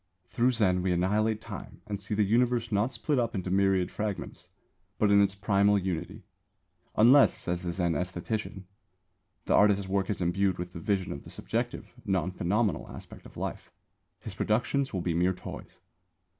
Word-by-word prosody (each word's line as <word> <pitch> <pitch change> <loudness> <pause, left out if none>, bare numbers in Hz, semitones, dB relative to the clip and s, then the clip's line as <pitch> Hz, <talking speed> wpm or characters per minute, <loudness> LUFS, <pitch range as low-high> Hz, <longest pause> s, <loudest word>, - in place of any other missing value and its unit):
Through 120 +7 +1
Zen 95 -6 +2
we 90 0 0
annihilate 105 +5 +1
Time - - -9
and 100 -2 -5
see 105 +2 -3
the 105 - +3
Universe 120 +2 +1
not 105 +5 +1
split 145 +1 -1
up 115 -2 -1
into 95 -1 -3
myriad 95 -1 +2
fragments, 105 -2 -5 0.5
but 105 -1 +3
in 100 0 +6
its 100 -1 +2
primal 100 0 +3
unity. 90 -3 -4 0.7
Unless, 130 +6 +6
says 90 0 -3
the 90 - -3
Zen 85 -1 0
æsthetician, 90 +3 -3 0.8
the - - +1
artist's 100 -2 +4
work 95 0 0
is 105 - -1
imbued 95 +1 +1
with 90 0 -6
this 85 - -7
vision 95 0 -1
of 70 - -6
the - - -12
subjective, - - -4
non 95 -2 0
phenomenal 100 +4 0
aspect - - -11
of - - -16
life, - - -5 0.5
his - - -8
productions 130 +5 0
will 95 - -2
be 85 -1 -1
mere 90 +3 +2
toys. - - -9
100 Hz, 170 wpm, -29 LUFS, 90-110 Hz, 0.8 s, in